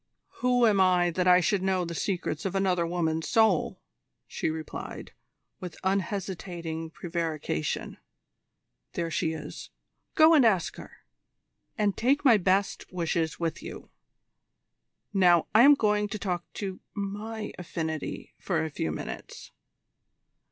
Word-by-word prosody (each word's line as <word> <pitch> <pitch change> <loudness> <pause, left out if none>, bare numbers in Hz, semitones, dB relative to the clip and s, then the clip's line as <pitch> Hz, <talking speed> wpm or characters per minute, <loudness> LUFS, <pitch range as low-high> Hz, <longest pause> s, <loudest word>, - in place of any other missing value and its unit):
"Who 245 -1 +3
am 205 -4 +4
I 180 -2 +4
that 180 +2 0
I 180 0 +7
should 190 +2 +1
know 190 -1 +1
the 170 - -5
secrets 170 -3 -2
of 195 -1 -3
another 185 -3 +1
woman's 160 -2 -1
soul?" 220 -7 +3 0.5
she - - -2
replied, 155 -1 -6 0.5
with 180 -2 -8
unhesitating 185 -4 -3
prevarication. 165 - -3 0.9
"There 170 -1 -2
she 160 0 0
is. 150 -2 -8 0.5
Go 315 +1 +7
and 295 -5 +6
ask 195 -7 +2
her, - - -13 0.7
and 205 -2 +1
take 275 +5 +1
my 235 -5 +7
best 195 +1 0
wishes 165 -2 -1
with 165 -2 -2
you. - - -9 1.2
Now 180 -4 +5
I 220 - +7
am 285 +3 +8
going 210 -4 +1
to 215 - -5
talk 180 -4 -4
to 190 -2 -5 0.2
my 210 +2 -5
affinity 160 -3 -4
for - - -1
a 160 - -5
few 80 - -2
minutes." 80 - -7
185 Hz, 130 wpm, -28 LUFS, 165-205 Hz, 1.2 s, am